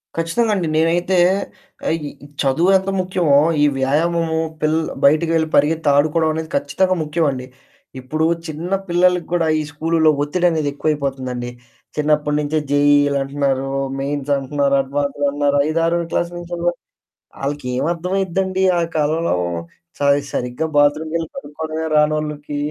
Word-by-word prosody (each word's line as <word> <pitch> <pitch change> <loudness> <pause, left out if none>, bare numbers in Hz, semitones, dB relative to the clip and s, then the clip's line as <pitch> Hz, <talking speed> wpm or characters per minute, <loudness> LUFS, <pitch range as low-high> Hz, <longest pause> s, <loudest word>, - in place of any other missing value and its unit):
ఖచ్చితంగా 165 +8 0
అండి. 175 -4 -1
నేనైతే 175 +3 +2 0.7
ఆహ్, 160 - +2
ఇ 145 0 -12
చదువెంత 185 +8 +2
ముఖ్యమో 180 -6 +2 0.3
ఈ - - +6
వ్యాయామము 160 +4 +1 0.2
పిల్లల 155 +1 +1 0.2
బయటికి 155 +3 +4
వెళ్లి 160 -1 +1
పరిగెత్తి 150 +1 +2
ఆడుకోవడం 155 +2 +2
అనేది 160 0 -4
ఖచ్చితంగా 185 +7 +1
ముఖ్యమండి. 150 -5 -1 0.5
ఇప్పుడు 155 +5 -1 0.2
చిన్న 160 +4 -6 0.2
పిల్లలకి 180 0 +2
గూడా 170 -2 +1
ఈ - - 0
స్కూలులో 160 +1 +2
ఒత్తిడనేది 160 -1 +1
ఎక్కువైపోతుందండి. 135 -5 -2 0.5
చిన్నప్పడి 150 0 +1
నుంచే 150 +1 -1
జేఈఈలంటన్నారు 140 -1 +2 0.3
మెయిన్స్ 145 0 -3
అంటున్నారు, 140 +1 0
అడ్వాన్స్‌లంటన్నారు. 145 +1 0
ఐదారో 165 +2 +1
క్లాసు 170 0 0
నుంచి 175 0 -8
కూడా, 175 - +2 0.7
ఆళ్ళకేం 135 -2 -2
అర్థమైద్దండి 190 +1 -1 0.2
ఆ - - +1
కాలంలో 155 - +1 0.6
స - - -9 0.3
సరిగ్గా 125 +5 -2
బాత్‌రూమ్‌కెళ్లి 155 +3 +1
కడుక్కోడమే 160 - -5
రానోళ్ళకి 150 -1 0
155 Hz, 115 wpm, -19 LUFS, 145-165 Hz, 0.7 s, ఈ